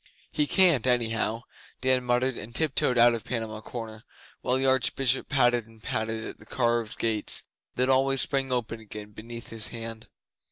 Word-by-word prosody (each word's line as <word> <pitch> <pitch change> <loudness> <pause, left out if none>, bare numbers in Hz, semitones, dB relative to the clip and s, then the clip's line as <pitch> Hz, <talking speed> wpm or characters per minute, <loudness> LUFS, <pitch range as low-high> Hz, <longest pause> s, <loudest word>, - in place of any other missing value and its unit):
He 150 - 0
can't, 170 - +4
anyhow,' 115 -2 +1 0.4
Dan 130 -1 +3
muttered, 125 +1 +1
and 115 +2 -9
tiptoed 135 -4 +2
out 120 0 +7
of 115 - -3
Panama 110 -3 -4
Corner 110 -1 -7 0.4
while 125 - +1
the 135 - 0
Archbishop 130 0 +2
patted 120 -4 +3
and 115 -1 -18
patted 110 0 -2
at - - -8
the - - -15
carved 120 -3 0
gates 110 -2 0 0.3
that 125 +1 +2
always 135 +1 +3
sprang 135 -2 0
open 115 -2 -2
again 105 -1 -9
beneath 115 +2 -9
his 115 -1 -3
hand. 115 -1 -6
120 Hz, 165 wpm, -27 LUFS, 110-130 Hz, 0.4 s, out